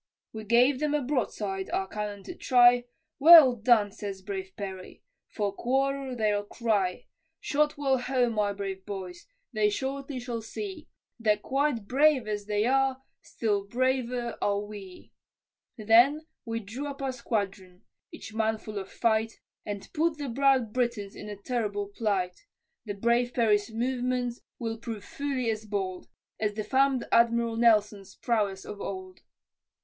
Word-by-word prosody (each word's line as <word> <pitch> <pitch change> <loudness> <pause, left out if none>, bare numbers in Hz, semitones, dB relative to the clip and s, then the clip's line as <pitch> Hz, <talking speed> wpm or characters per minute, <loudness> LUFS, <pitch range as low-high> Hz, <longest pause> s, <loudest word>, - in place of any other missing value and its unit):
We 220 -1 -7
gave 245 +5 +4
them 300 0 0
a 295 - 0
broadside, 210 -7 -2
our 190 - -1
cannon 205 -1 -5
to - - -7
try, 245 -5 +5 0.3
"Well 305 -4 +9
done," 215 -2 +3
says 195 -2 -7
brave 190 -1 -5
Perry, 190 -2 -7 0.2
"for 205 -2 -2
quarter 270 +3 -1
they'll 210 -3 +1
cry, 205 -4 -1 0.3
Shot 300 0 0
well 270 -2 +1
home, 250 -2 +1
my 210 -2 +1
brave 195 -1 -5
boys, 190 - -7 0.3
they 215 -1 +3
shortly 270 +4 -4
shall 240 -2 -4
see, 360 - -7 0.3
That 210 -2 +1
quite 270 -6 0
brave 275 -2 +3
as 205 -1 -3
they 210 0 +1
are, 265 +1 +1 0.2
still 205 -3 -2
braver 250 0 -1
are 200 0 +1
we." 205 -3 -10 0.6
Then 240 +8 +4 0.2
we 230 0 -3
drew 235 +8 -6
up 280 -1 -6
our 265 - 0
squadron, 200 -6 -4 0.3
each 220 - -10
man 220 0 0
full 215 -1 -6
of 190 - -9
fight, 225 -1 +1 0.3
And 205 -1 -5
put 320 0 +1
the 285 -4 -4
proud 260 -3 +2
Britons 235 -5 -1
in 210 - -8
a 205 - -5
terrible 205 -2 -3
plight, 200 -4 -2 0.4
The 205 -2 -4
brave 235 +3 +1
Perry's 210 -3 +2
movements 245 +1 -2 0.2
will 225 -1 -4
prove 225 -3 -6
fully 265 -4 -2
as 215 0 -5
bold, 190 -3 -3 0.3
As 210 -1 -1
the 215 - -2
fam'd 265 +2 +2
Admiral 235 0 +3
Nelson's 210 -4 +2
prowess 205 -5 -1
of 205 -1 -8
old. 185 -1 -6
225 Hz, 150 wpm, -28 LUFS, 205-255 Hz, 0.6 s, Well